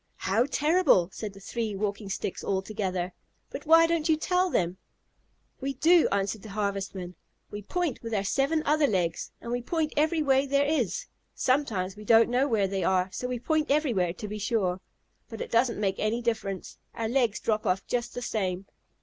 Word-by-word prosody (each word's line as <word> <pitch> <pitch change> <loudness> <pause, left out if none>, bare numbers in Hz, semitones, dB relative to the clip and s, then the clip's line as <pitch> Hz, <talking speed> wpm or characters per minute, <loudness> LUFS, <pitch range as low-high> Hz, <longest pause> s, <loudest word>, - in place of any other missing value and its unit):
"How 225 +7 +1
terrible!" 295 - +3
said 210 +3 -6
the 195 - -13
three 220 +1 -3
Walking 200 0 -3
Sticks 190 - -4
all 190 -1 -1
together. 185 -3 -3 0.4
"But - - -7
why 330 +1 +7
don't 330 -1 0
you 315 - +4
tell 360 +3 +1
them?" 180 - 0 0.8
"We 275 0 -3
do," 335 +5 +5
answered 200 +1 -1
the 220 - -10
Harvestmen. 195 -3 -3 0.4
"We 205 - -5
point 345 - -2
with 230 - -6
our 205 -3 0
seven 280 +9 +1
other 300 0 +3
legs, 175 -7 -1
and 235 - -6
we 245 0 -1
point 315 +4 -1
every 310 +1 +2
way 270 -1 +3
there 280 +1 +2
is. 320 +11 0 0.3
Sometimes 220 -9 0
we 210 - -10
don't 225 +2 +5
know 255 +3 +2
where 215 -6 +2
they 190 -1 -2
are, 185 +1 +1
so 250 - -4
we 250 0 -2
point 310 +5 0
everywhere, 240 - +1
to 210 +4 -7
be 210 +1 -5
sure. 195 -4 0 0.5
But 225 - -8
it - - -5
doesn't 235 -1 +2
make 195 -2 -1
any 225 +3 0
difference. 210 -5 -3 0.2
Our 225 - -2
legs 240 -3 +1
drop 215 -1 -1
off 185 +1 0
just 240 0 -2
the 245 - -4
same." 190 -5 -2
225 Hz, 190 wpm, -28 LUFS, 195-280 Hz, 0.8 s, why